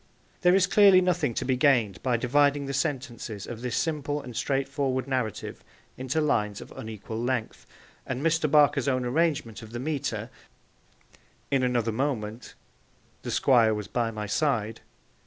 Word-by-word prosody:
There 180 0 +5
is 190 -1 +4
clearly 195 -1 +6
nothing 175 -9 0
to - - -2
be 130 0 +1
gained 125 -8 +2
by 125 -2 +1
dividing 140 +3 +2
the 140 - -4
sentences 130 - -3
of 120 -1 -8
this 125 -1 -2
simple 150 -2 -1
and 125 -4 -9
straightforward 135 0 -1
narrative 125 -6 -3 0.3
into 130 +4 -2
lines 105 -9 0
of - - -11
unequal 110 0 -7
length, 120 -2 -3 0.4
and 130 +2 -3
Mr. 165 -1 +2
Barker's 145 -2 +4
own 130 -2 +1
arrangement 140 -5 0
of 110 0 -12
the 120 - -4
metre, 145 +1 -3 1.2
In 135 -1 +2
another 120 -3 +1
moment, 115 -2 -3 0.7
The - - -6
Squire 115 -5 +4
was 105 -2 -5
by 115 +3 -1
my 110 -1 -5
side. 110 -2 -1
130 Hz, 155 wpm, -27 LUFS, 115-145 Hz, 1.2 s, clearly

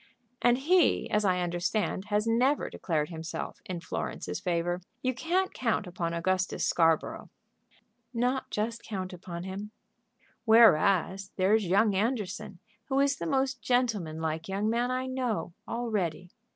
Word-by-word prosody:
"And 245 0 +4
he, 320 -2 +3
as 210 0 +2
I 185 -2 +2
understand, 180 +3 -1
has 210 +1 0
never 250 +6 +2
declared 155 -3 -1
himself 165 -1 -6
in 180 -2 -4
Florence's 90 - -4
favor. 175 +1 -1 0.2
You 255 0 +1
can't 350 +8 0
count 230 -4 0
upon 175 -2 -3
Augustus 185 +2 0
Scarborough." 165 -2 +1 0.8
"Not 250 +2 0
just 225 +2 -2
count 190 -4 -5
upon 175 -1 -7
him." 195 +3 -6 0.7
"Whereas 195 -3 +5
there's 200 +2 +3
young 200 +4 +4
Anderson, 205 -2 -2 0.3
who 270 +1 0
is 280 0 +3
the - - -4
most 270 -3 0
gentleman 215 -10 0
like 160 +2 -3
young 200 +2 -1
man 240 +2 +1
I 255 0 -1
know, 255 -8 -2
all 235 0 -3
ready. 180 -3 -2
205 Hz, 140 wpm, -29 LUFS, 180-245 Hz, 0.8 s, Whereas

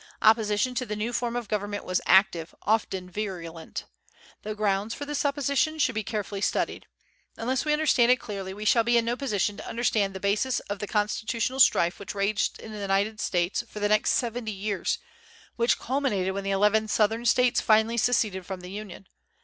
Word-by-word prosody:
Opposition 220 +2 +3
to 255 +1 -2
the 210 - -3
new 220 +3 -3
form 240 0 -1
of 240 -3 -3
government 205 0 -3
was 185 0 0
active, 175 -3 +3
often 195 -3 0
virulent. 175 -5 -6 0.6
The 215 0 -5
grounds 205 +1 0
for 285 - -6
this 295 0 -2
opposition 285 +2 +1
should 290 -4 +2
be 220 0 -2
carefully 205 -1 -4
studied. - - -1 0.5
Unless 255 +4 -1
we 300 - +2
understand 285 -6 +4
it - - +7
clearly, 195 -3 -6
we 210 +2 -7
shall 230 +2 +4
be 240 +1 +3
in 230 - +2
no 235 +1 0
position 210 -6 -1
to - - -8
understand 215 -4 0
the - - -4
basis 210 +6 +1
of 205 -1 -6
the 210 - -4
constitutional 225 +4 -1
strife 175 -9 +4
which 200 0 -7
raged 200 +1 0
in 220 - -9
the 210 - -7
United 200 +2 0
States 175 +5 0
for 210 - -8
the 205 0 +1
next 215 0 +3
seventy 235 -2 -1
years, 200 -1 -2 0.6
which 235 0 +2
culminated 230 -8 -1
when 200 0 -4
the - - -1
eleven 210 +2 +3
Southern 220 +2 +1
States 245 +1 +3
finally 220 +1 +3
seceded 220 -5 +1
from 185 0 -6
the 180 +1 -9
Union. 200 -2 -8
215 Hz, 190 wpm, -27 LUFS, 200-235 Hz, 0.6 s, it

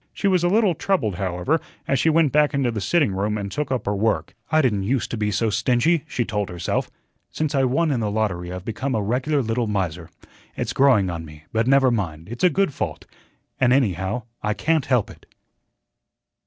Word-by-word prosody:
She 200 - -1
was 185 -3 +3
a - - +4
little 205 -1 +3
troubled, 135 - -1
however, 95 - 0 0.3
as 135 - +1
she 165 - +3
went 160 -3 +3
back 150 -1 +3
into 135 -3 +1
the 110 -2 -4
sitting 150 - +2
room 105 +2 -1
and 100 -1 -4
took 150 +2 -3
up 125 -4 -1
her 100 - 0
work. 110 +2 0 0.2
"I 155 - +4
didn't 105 -6 +1
use 120 +6 0
to - - -3
be 105 -1 -1
so 105 +2 0
stingy," 140 +9 +2
she 120 -5 -2
told 105 -3 -2
herself. 90 -1 -2 0.4
"Since 155 -1 -2
I 135 -2 +3
won 150 +5 +1
in 130 - 0
the 110 -2 -1
lottery 100 -5 -2
I've 90 +1 -7
become 130 +4 -2
a 105 - 0
regular 130 +6 0
little 115 +1 -1
miser. 90 -5 -2 0.5
It's - - -2
growing 120 -9 +4
on 85 -1 -5
me, 75 -1 -13
but 110 +1 +1
never 135 -1 +5
mind, 85 -6 -3
it's 120 +1 -6
a 180 - +7
good 195 -1 +1
fault, 85 -11 -4 0.5
and, 125 -2 +4
anyhow, 110 - +1 0.2
I 105 0 -1
can't 160 0 0
help 125 -5 +1
it." - - -17
115 Hz, 210 wpm, -23 LUFS, 100-140 Hz, 0.5 s, a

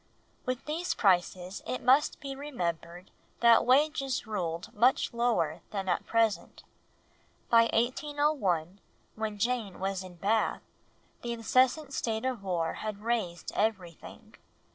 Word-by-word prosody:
With 255 0 -2
these 325 +4 -2
prices 185 -1 +1
it 255 - -3
must 275 +4 +4
be 275 -2 -6
remembered 180 - -5 0.3
that 235 0 +6
wages 275 0 +2
ruled 175 -5 -4
much 240 +4 +2
lower 180 -10 0
than 195 -2 -4
at 180 - -1
present. 225 -2 0 0.9
By 230 -1 +6
1801, 240 - 0 0.3
when 215 -1 -4
Jane 230 -3 -1
was 190 0 -2
in 185 -1 -11
Bath, 210 +5 0 0.6
the 240 0 -3
incessant 255 +5 +2
state 225 -1 -2
of 255 -5 -2
war 175 -4 -1
had 210 -1 -5
raised 220 -7 -2
everything. 190 -6 -3
220 Hz, 120 wpm, -30 LUFS, 185-255 Hz, 0.9 s, that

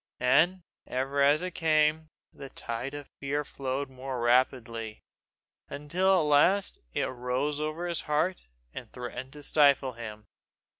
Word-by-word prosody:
And 170 +9 +3 0.2
ever 135 +2 -1
as 145 +4 +4
it 185 -1 -4
came, 155 -1 +2 0.2
the 135 -1 -9
tide 125 +3 -5
of 145 -1 -8
fear 145 +1 -2
flowed 135 +1 -3
more 130 -1 -6
rapidly, 120 -2 +1 0.7
until 170 +7 +1
at - - +2
last 150 +7 +3
it - - -1
rose 130 +4 -2
over 155 +3 -3
his 170 -1 -1
heart, 150 - -1 0.3
and - - -8
threatened 125 +1 -7
to 150 -1 -11
stifle 140 -3 +4
him. 110 -2 -8
140 Hz, 140 wpm, -29 LUFS, 125-155 Hz, 0.7 s, as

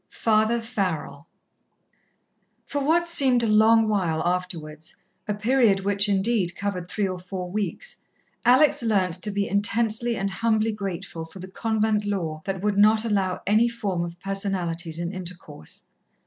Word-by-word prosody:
XXI - - -20
Father 220 +1 +2
Farrell 185 - -3 1.4
For 285 -1 -3
what 340 +4 +2
seemed 270 -8 +3
a - - +2
long 220 +1 +5
while 180 -7 0
afterwards 165 -4 -4 0.3
a 210 - -1
period 215 -2 +3
which, 200 +1 +2
indeed, 195 -2 +1
covered 190 -3 -4
three 205 0 -1
or 185 -1 -4
four 180 0 -6
weeks 215 - -3 0.4
Alex 255 +5 +5
learnt 200 -6 +1
to 210 - +1
be 200 0 -1
intensely 225 +3 +1
and 195 0 -2
humbly 220 +1 +1
grateful 195 -4 -5
for 165 +3 -12
the 185 0 -8
convent 215 +1 0
law 170 -7 -3
that 195 -2 -3
would 205 0 0
not 215 +2 +5
allow 195 -4 -1
any 215 +4 +3
form 200 -7 -2
of 170 0 -7
personalities 180 -4 -2
in 170 +2 -3
intercourse. 175 - -8
200 Hz, 150 wpm, -24 LUFS, 180-220 Hz, 1.4 s, long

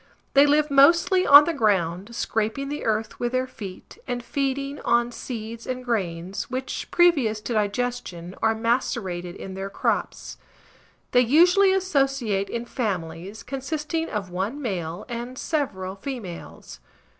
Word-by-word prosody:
They 280 +1 +7
live 300 +1 +3
mostly 335 +6 +5
on 285 +1 +10
the 335 - -1
ground, 200 - 0
scraping 225 +5 -1
the 295 +1 -4
earth 220 -1 -1
with 240 +1 -2
their 255 0 +1
feet, 205 -7 -10
and 245 -1 -3
feeding 275 +2 -2
on 235 0 +2
seeds 230 -2 -7
and 255 0 -4
grains, 185 -5 -2
which, 260 +1 -4
previous 280 -12 +3
to 235 - -4
digestion, 210 -5 -2
are 220 0 +3
macerated 220 -6 -1
in 190 - -8
their 195 +1 -5
crops. - - -2 0.7
They 245 - +5
usually 355 - +5
associate 270 - 0
in 235 0 -4
families, 195 -4 -4
consisting 300 +5 -3
of 195 -4 -4
one 195 +10 -3
male 180 - -4
and 240 +1 -6
several 195 - -2
females. 200 -5 -8
235 Hz, 135 wpm, -24 LUFS, 200-275 Hz, 0.7 s, on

